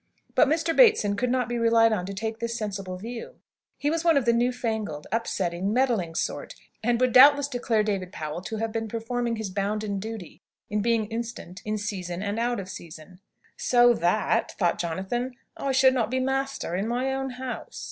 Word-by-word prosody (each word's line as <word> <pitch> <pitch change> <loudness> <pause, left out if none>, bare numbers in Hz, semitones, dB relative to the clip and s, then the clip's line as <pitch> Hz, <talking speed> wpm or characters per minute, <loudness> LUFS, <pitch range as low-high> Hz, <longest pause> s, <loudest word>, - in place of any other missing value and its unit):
But - - +5
Mr. 325 +2 +1
Bateson 435 - +5
could 250 +4 0
not 250 -1 +1
be 240 0 -2
relied 230 -1 +4
on 180 -4 -2
to 200 - -5
take 220 +2 -4
this 235 0 -2
sensible 195 -4 -4
view. 240 - -7 0.4
He 290 - 0
was 330 0 -1
one 330 -3 +4
of 270 - +1
the 235 - +4
new 240 +2 +2
fangled, 220 -11 -3
upsetting, 190 -4 -1
meddling 230 -10 +1
sort, - - -3 0.3
and 235 +1 +1
would 255 -1 +3
doubtless 285 +2 +8
declare 240 -5 0
David 195 -4 -2
Powell 155 +2 -5
to 225 - -4
have 225 +1 -2
been 225 0 -2
performing 230 +2 -2
his 220 -4 -4
bounden 200 +1 -2
duty, 215 -4 -7 0.3
in 210 0 +1
being 230 0 +2
instant 225 -5 -6
in 215 0 -1
season 190 -3 -4
and 205 +2 -2
out 240 0 0
of 190 - -6
season. 170 0 -10 0.4
"So 240 -1 +5
that," 180 +1 +1
thought 175 -4 0
Jonathan, 195 +9 -2 0.2
"I 275 - -2
should 260 0 +5
not 235 -4 0
be 260 +1 0
master 270 -7 -1
in 195 +4 -1
my 250 +3 0
own 270 0 -2
house!" 255 -1 -6
225 Hz, 195 wpm, -26 LUFS, 200-250 Hz, 0.4 s, doubtless